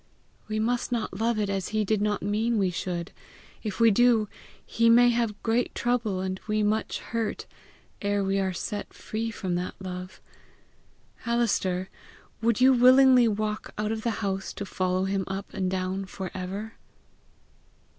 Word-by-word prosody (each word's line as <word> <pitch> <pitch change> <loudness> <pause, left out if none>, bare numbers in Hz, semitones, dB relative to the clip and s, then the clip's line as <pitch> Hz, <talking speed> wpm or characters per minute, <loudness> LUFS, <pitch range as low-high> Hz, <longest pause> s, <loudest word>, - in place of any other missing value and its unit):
We 215 - -2
must 240 +3 0
not 220 -5 -2
love 230 0 +1
it 210 -1 0
as 195 -2 -2
he 215 0 0
did 215 0 +1
not 210 -1 0
mean 220 +3 +1
we 190 -3 +2
should. 175 0 -4 0.5
If 210 -4 -5
we 230 -1 +6
do, 230 0 +4 0.4
he 230 +1 +2
may 240 +1 +7
have 230 -3 -1
great 235 +2 0
trouble 235 -6 0
and 190 0 -3
we 215 0 +1
much 215 +1 0
hurt 225 -2 -3 0.6
ere 205 0 0
we 195 0 +1
are 190 -1 0
set 205 +3 -5
free 225 +1 -4
from 190 -5 -3
that 180 +1 -4
love. 185 -1 -7 1.1
Alister, 200 -6 +1 0.5
would 230 -1 +2
you 260 +1 +6
willingly 255 0 +7
walk 215 0 -2
out 210 +1 -1
of 220 0 -2
the 225 -2 -2
house 195 0 -2
to 200 - -5
follow 185 -1 -1
him 195 0 0
up 195 +1 -5
and 185 -1 -1
down 190 +1 -2
for 190 -1 -6
ever?" 195 +4 -5
210 Hz, 165 wpm, -27 LUFS, 190-230 Hz, 1.1 s, may